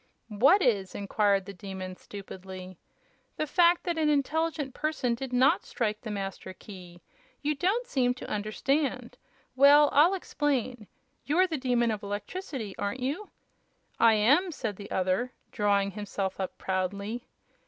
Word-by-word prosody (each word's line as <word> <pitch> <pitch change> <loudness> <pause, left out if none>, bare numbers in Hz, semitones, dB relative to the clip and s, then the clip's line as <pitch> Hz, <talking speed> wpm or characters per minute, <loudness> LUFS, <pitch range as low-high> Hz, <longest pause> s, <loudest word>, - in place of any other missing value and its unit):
"What 270 - +4
is?" 200 -7 +1
inquired 200 -1 +1
the 200 - -8
Demon, 190 -1 -7
stupidly. 185 -2 -10 0.6
"The 310 - 0
fact 345 +3 +4
that 340 -2 -1
an 305 -1 +2
intelligent 295 -1 0
person 305 -6 -1
did 255 +2 -5
not 255 +2 +3
strike 215 -3 -2
the 225 - -7
Master 195 -2 -5
Key. 180 -3 -12 0.4
You 300 +1 +1
don't 385 - 0
seem 250 - +1
to - - -8
understand. 255 +8 -1 0.4
Well, 285 +2 +7
I'll 330 +7 +5
explain. 255 - -2 0.4
You're 345 +6 +3
the 340 -4 -3
Demon 245 -3 +1
of 215 -1 -3
Electricity, 205 - -5
aren't 205 +6 -3
you?" 295 +11 -3 0.7
"I 230 -1 +6
am," 285 - +3
said 225 - -4
the 200 - -9
other, 190 +7 0 0.2
drawing 200 -1 +1
himself 200 -2 -4
up 190 - -4
proudly. 200 +5 -3
235 Hz, 145 wpm, -28 LUFS, 200-290 Hz, 0.7 s, Well